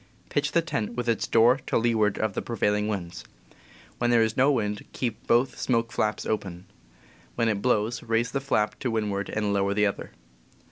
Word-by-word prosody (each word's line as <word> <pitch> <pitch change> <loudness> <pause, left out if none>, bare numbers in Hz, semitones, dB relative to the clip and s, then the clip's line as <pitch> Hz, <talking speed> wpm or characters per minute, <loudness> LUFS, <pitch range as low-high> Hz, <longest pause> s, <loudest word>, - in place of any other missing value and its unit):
Pitch 145 0 -1
the 170 - +3
tent 115 -8 -3
with 120 0 -3
its 115 -2 0
door 120 +3 +5
to - - +1
leeward 110 -3 +2
of 110 -2 -1
the - - -2
prevailing 105 -2 0
winds. 90 -5 -4 0.8
When 120 - +1
there 120 -1 +5
is 110 -1 -1
no 135 +3 +4
wind, 105 -5 -1
keep 115 -5 -4
both 120 +3 +2
smoke 115 -2 0
flaps 105 0 -1
open. 95 -4 -3 0.7
When 115 - +1
it 105 -3 0
blows, 115 -1 +1
raise 115 +1 0
the 135 - -2
flap 110 -6 0
to 130 - -2
windward 105 -3 -2
and 105 -1 -1
lower 100 0 +1
the 105 0 +3
other. 100 - -3
110 Hz, 190 wpm, -26 LUFS, 105-120 Hz, 0.8 s, door